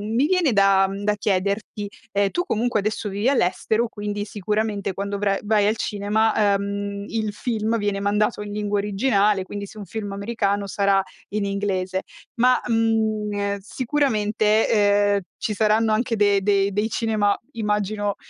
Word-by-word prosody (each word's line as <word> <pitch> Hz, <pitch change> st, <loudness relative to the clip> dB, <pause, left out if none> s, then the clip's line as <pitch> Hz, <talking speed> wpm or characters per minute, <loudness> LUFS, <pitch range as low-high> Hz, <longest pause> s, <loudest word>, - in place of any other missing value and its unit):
mi 260 Hz, +5 st, +3 dB
viene 350 Hz, -4 st, +2 dB
da 195 Hz, -1 st, +4 dB
da 210 Hz, 0 st, +2 dB
chiederti, 200 Hz, +1 st, -1 dB, 0.3 s
ehm, 200 Hz, 0 st, +2 dB
tu 355 Hz, -, 0 dB
comunque 240 Hz, -, 0 dB
adesso 215 Hz, +1 st, -2 dB
vivi 205 Hz, +5 st, 0 dB
all'estero 220 Hz, 0 st, +1 dB
quindi 205 Hz, -1 st, -4 dB
sicuramente 210 Hz, -1 st, -2 dB
quando 200 Hz, +1 st, -3 dB
vra 195 Hz, -1 st, +1 dB
vai 210 Hz, -1 st, +2 dB
al 215 Hz, +2 st, +1 dB
cinema, 210 Hz, 0 st, +1 dB
ehm, 200 Hz, 0 st, -3 dB
il 220 Hz, -2 st, -2 dB
film 225 Hz, +1 st, -1 dB
viene 205 Hz, -2 st, -1 dB
mandato 210 Hz, +2 st, 0 dB
in 205 Hz, 0 st, -6 dB
lingua 205 Hz, -1 st, -1 dB
originale 205 Hz, -1 st, +2 dB
quindi 200 Hz, +2 st, -6 dB
se -, -, -14 dB
è -, -, -7 dB
un 205 Hz, -, -7 dB
film 205 Hz, -1 st, -5 dB
americano 200 Hz, -1 st, -1 dB
sarà 195 Hz, 0 st, +2 dB, 0.3 s
in 210 Hz, 0 st, -2 dB
inglese 190 Hz, -2 st, -1 dB, 0.4 s
ma, 255 Hz, +2 st, +5 dB
mhmm, 215 Hz, -3 st, 0 dB
sicuramente, 220 Hz, -3 st, +1 dB
ehm, 205 Hz, -1 st, +3 dB, 0.2 s
ci 215 Hz, -, -2 dB
saranno 215 Hz, +1 st, +2 dB
anche 230 Hz, +2 st, +1 dB
de 205 Hz, -2 st, +3 dB
dei 200 Hz, 0 st, +2 dB
dei 210 Hz, +3 st, 0 dB
cinema 215 Hz, -3 st, +1 dB
immagino, 210 Hz, -1 st, -1 dB
205 Hz, 155 wpm, -23 LUFS, 200-220 Hz, 0.4 s, ma